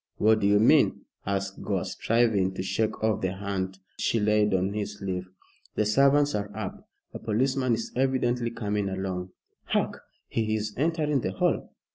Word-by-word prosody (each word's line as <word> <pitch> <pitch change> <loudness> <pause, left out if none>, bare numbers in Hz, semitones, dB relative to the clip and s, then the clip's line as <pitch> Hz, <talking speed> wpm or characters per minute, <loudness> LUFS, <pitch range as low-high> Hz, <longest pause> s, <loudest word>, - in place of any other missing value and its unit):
"What 110 +1 +4
do 100 - +2
you 105 0 +5
mean?" 110 - +4 0.3
asked 100 0 -2
Gore, - - -1
striving 110 -5 +1
to 95 - -3
shake 110 +3 -1
off 110 -2 +1
the 95 -1 -1
hand 95 -1 -3 0.2
she 115 - +1
laid 105 0 +3
on 95 +1 +1
his 105 0 -4
sleeve. 95 -2 -4 0.5
"The 105 - +2
servants 140 +6 +4
are 105 -1 -2
up 105 -4 -6 0.2
a - - -6
policeman 130 +3 +1
is 115 - -5
evidently 125 -2 +1
coming 105 -3 -2
along. 95 -1 -3 0.4
Hark! - - -1 0.3
he 110 -1 0
is 105 0 -3
entering 150 -2 +1
the 95 - -2
hall. 95 - 0
105 Hz, 165 wpm, -27 LUFS, 95-115 Hz, 0.5 s, you